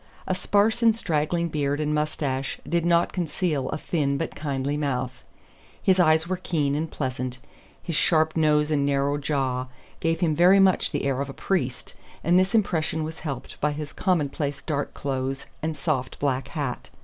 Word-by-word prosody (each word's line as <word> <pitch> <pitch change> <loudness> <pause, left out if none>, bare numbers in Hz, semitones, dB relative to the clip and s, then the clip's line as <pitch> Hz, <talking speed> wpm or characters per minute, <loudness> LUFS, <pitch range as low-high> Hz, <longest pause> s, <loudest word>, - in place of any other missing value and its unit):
A - - 0
sparse 205 +5 +2
and 225 -2 +5
straggling 170 -2 0
beard 145 -1 -1
and 150 0 0
mustache 145 -3 -1
did 170 -1 +1
not 170 0 +3
conceal 160 -5 -1
a - - -2
thin 145 -4 0
but 165 - -3
kindly 140 -1 -2
mouth; 130 -3 -2 0.6
his 190 -1 +3
eyes 160 -1 +4
were 185 0 -1
keen 155 -6 0
and 155 +2 -1
pleasant; 130 -3 -3 0.5
his 170 - -3
sharp 160 0 +3
nose 150 -1 +3
and 145 -2 +2
narrow 140 +1 +1
jaw 135 -3 -1 0.3
gave 165 0 0
him 165 -3 +3
very 180 +4 +6
much 190 -1 +4
the - - -2
air 135 -1 0
of 140 - -3
a - - -6
priest, 135 -10 -2 0.3
and 175 +3 +5
this 185 +3 +1
impression 160 -6 +1
was 160 +1 -6
helped 140 -5 -6
by 150 0 +2
his 150 0 -6
commonplace 145 -5 -1
dark 145 -3 -2
clothes 135 0 -3 0.2
and 160 -1 -2
soft 135 -6 -1
black 135 -2 -1
hat. 140 -4 -4
150 Hz, 175 wpm, -25 LUFS, 140-170 Hz, 0.6 s, very